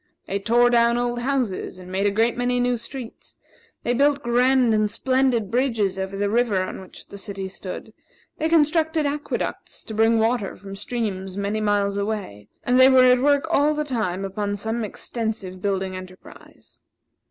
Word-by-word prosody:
They 200 - -2
tore 240 +4 +3
down 235 0 +4
old 240 0 -1
houses 245 -8 -2
and 185 0 -11
made 195 +2 +1
a - - +4
great 225 +3 +1
many 245 0 0
new 245 0 +1
streets; 240 +1 -8 0.5
they 245 - +1
built 285 +2 +2
grand 245 0 +3
and 215 -1 +2
splendid 255 -2 +1
bridges 225 -7 0
over 190 +1 -4
the 205 0 0
river 225 -2 +1
on 185 - -6
which 185 - -11
the 200 - -9
city 195 -1 -5
stood; 190 +3 -8 0.5
they 315 - 0
constructed 320 0 +2
aqueducts 290 +1 -4
to 220 - -8
bring 225 +1 +3
water 225 -2 0
from 195 0 -10
streams 195 -3 -4
many 200 +2 -1
miles 205 -1 +1
away; 200 - -4 0.2
and 250 +1 +3
they 260 +1 +8
were 260 -1 +6
at 250 0 +3
work 285 +1 +3
all 300 0 +3
the 300 0 -1
time 210 -8 -2
upon 205 +1 -3
some 220 +3 -3
extensive 215 -3 -4
building 190 -1 -1
enterprise. 185 0 -13
225 Hz, 175 wpm, -23 LUFS, 200-250 Hz, 0.5 s, they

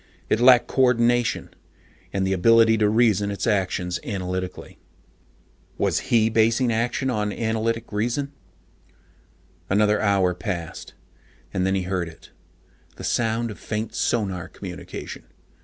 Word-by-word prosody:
It 110 - +2
lacked 125 0 +6
coordination, 120 -2 +2 0.6
and 95 -1 -1
the 95 - +1
ability 115 +4 +5
to 105 -1 +3
reason 105 -3 +3
its 100 - -3
actions 95 -4 0
analytically. 90 -2 -5 1.0
Was - - +1
he 110 -2 +4
basing 115 +2 +2
action 125 +3 -1
on 105 -3 -1
analytic 115 +1 -2
reason? 120 +7 -1 1.4
Another 105 +2 +3
hour 100 -3 +2
had 90 - -17
passed. 85 -6 -5 0.6
And 95 0 0
then 95 - +1
he 95 - -1
heard 90 -2 -2
it. 80 - -17 0.6
The - - -10
sound 115 0 0
of 105 - -10
faint 110 0 -4
sonar 95 -7 -1
communication. - - -8
110 Hz, 125 wpm, -23 LUFS, 95-115 Hz, 1.4 s, lacked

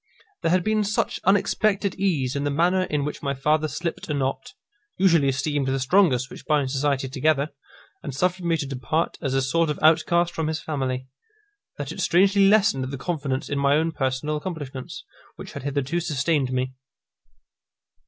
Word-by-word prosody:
There - - +1
had 180 +1 +2
been 215 +1 +1
such 205 +1 -1
unexpected 200 0 +2
ease 150 -10 0
in 140 - -1
the 145 - 0
manner 175 +6 +2
in 150 -4 -1
which 150 - -5
my 140 -1 -2
father 150 +3 +1
slipt 165 +4 -5
a 150 - 0
knot, 135 - -2 0.4
usually 170 -7 +4
esteemed 135 +1 0
the 135 0 0
strongest 135 -3 +3
which - - -11
binds 145 -4 +1
society 135 -1 0
together, 140 +2 +1 0.5
and 145 - -5
suffered 180 +6 -1
me 170 -1 +1
to 145 - -3
depart 135 +5 -2
as 135 -4 -1
a 135 - +2
sort 165 +4 +1
of 150 - -2
outcast 170 +2 +3
from 160 -2 -2
his 160 0 -2
family, 130 -4 -3 0.7
that 145 -2 -5
it - - -5
strangely 195 +2 +4
lessened 205 -10 +3
the 135 +1 -5
confidence 140 -2 -3
in 145 - -2
my 140 0 +3
own 160 +2 +1
personal 135 +2 -1
accomplishments, 145 -6 -6 0.3
which - - -9
had - - -6
hitherto 140 +4 -1
sustained 150 -4 0
me. 130 0 -1
150 Hz, 175 wpm, -24 LUFS, 135-170 Hz, 0.7 s, usually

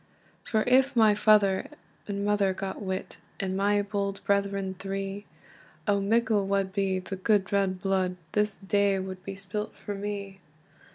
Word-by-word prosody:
"For 220 -2 +1
if 260 +2 +4
my 220 -2 +6
father 205 -2 +4 0.4
and 200 -1 -2
mother 205 -2 +2
got 195 +1 -5
wit, 190 -1 -4 0.2
And 190 -1 -2
my 205 +1 +2
bold 200 -1 -2
brethren 200 -1 0
three, 195 +1 -4 0.6
O 200 -1 +3
mickle 220 -1 +2
wad 195 -1 0
be 195 -1 +1
the 185 +1 -5
gude 200 0 +1
red 195 -1 +1
blude, 190 -2 +1 0.2
This 210 -1 +1
day 200 0 +2
wad 185 -1 -5
be 195 - -6
spilt 200 +2 -5
for 205 - -6
me! 200 -1 -5
200 Hz, 155 wpm, -28 LUFS, 195-205 Hz, 0.6 s, my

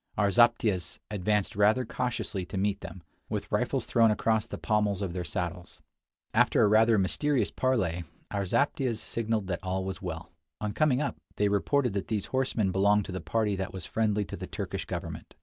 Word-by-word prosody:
Our 100 -1 +3
zaptiehs 115 -6 +3
advanced 105 0 0
rather 105 +5 +3
cautiously 115 -5 -2
to 100 - -5
meet 100 +1 0
them, 95 - -9 0.3
with - - -4
rifles - - 0
thrown 115 -1 +4
across 110 0 +1
the - - -6
pommels 105 -2 0
of 90 -3 -3
their 90 -1 -3
saddles. 85 +2 -4 0.5
After - - +4
a - - +6
rather 110 +2 +5
mysterious 135 +9 +1
parley, 95 -10 0 0.3
our 100 - -1
zaptiehs 130 +3 +1
signaled 110 -2 -2
that 90 -2 -2
all 95 0 -2
was 95 -1 -5
well. - - -6 0.3
On 105 -1 -2
coming 145 -4 +2
up, 145 - -2 0.2
they 105 0 +2
reported 125 +4 +1
that 100 - -2
these 105 -3 -1
horsemen 125 -7 +1
belonged 100 +2 +3
to - - -6
the 95 - -4
party 110 -3 0
that 95 0 -4
was 95 -2 -5
friendly 105 -2 0
to - - -6
the - - -7
Turkish - - -4
government. - - -6
105 Hz, 185 wpm, -29 LUFS, 95-115 Hz, 0.5 s, a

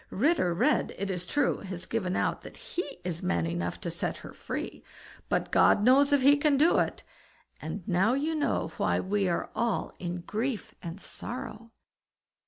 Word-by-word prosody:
Ritter 275 - +2
Red, 250 - +2
it 200 0 -2
is 180 -1 -4
true, 290 - +1
has 185 -3 -6
given 190 -5 -1
out - - 0
that - - -11
he 320 -6 -5
is 175 -2 -3
man 85 -2 0
enough 85 +1 -2
to - - -3
set - - -3
her - - -9
free, - - -5 0.5
but - - 0
God 205 - +5
knows 275 +4 +5
if 285 -2 +4
he 285 +2 +7
can 285 -1 +3
do 315 +5 +5
it; - - -1 0.6
and 165 +4 -6
now 190 +6 +3
you 300 +4 0
know 305 -2 0
why - - +1
we 195 0 0
are 170 - -2
all 235 -3 -1
in 175 -1 -4
grief 220 +5 -3
and 170 +3 -6
sorrow." 230 0 -6
210 Hz, 180 wpm, -29 LUFS, 180-275 Hz, 0.6 s, he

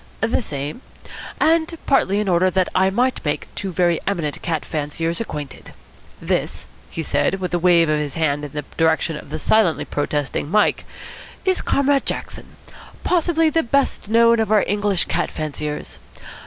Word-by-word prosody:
"The 225 +3 +1
same 145 - -5 0.6
and 325 +1 +3
partly 205 -8 +3
in 210 - -1
order 185 0 +3
that 185 0 +1
I 190 +1 +3
might 250 +6 0
make 145 -1 -2
two 195 -2 -4
very 175 -2 +2
eminent 170 -7 -2
cat 165 -2 -2
fanciers 160 +4 -3
acquainted. 150 - -7 0.5
This," - - -2 0.2
he 165 - -4
said, 145 +5 +1
with 180 -1 -4
a 175 - +2
wave 170 -1 +5
of 155 0 +1
his 145 -2 -4
hand 150 -2 0
in 145 - -6
the 150 0 -4
direction 160 0 +2
of 150 - -9
the 155 - -4
silently 180 +1 +2
protesting 145 0 -2
Mike, 210 +4 +2 0.6
"is 375 -1 +2
Comrade 280 0 +1
Jackson, - - -5 0.5
possibly 330 -2 +2
the 325 - +2
best 275 -3 0
known 230 +1 +5
of 220 -1 0
our 210 -2 +5
English 205 -2 +1
cat - - -1
fanciers. 150 -1 -5
180 Hz, 165 wpm, -21 LUFS, 155-225 Hz, 0.6 s, wave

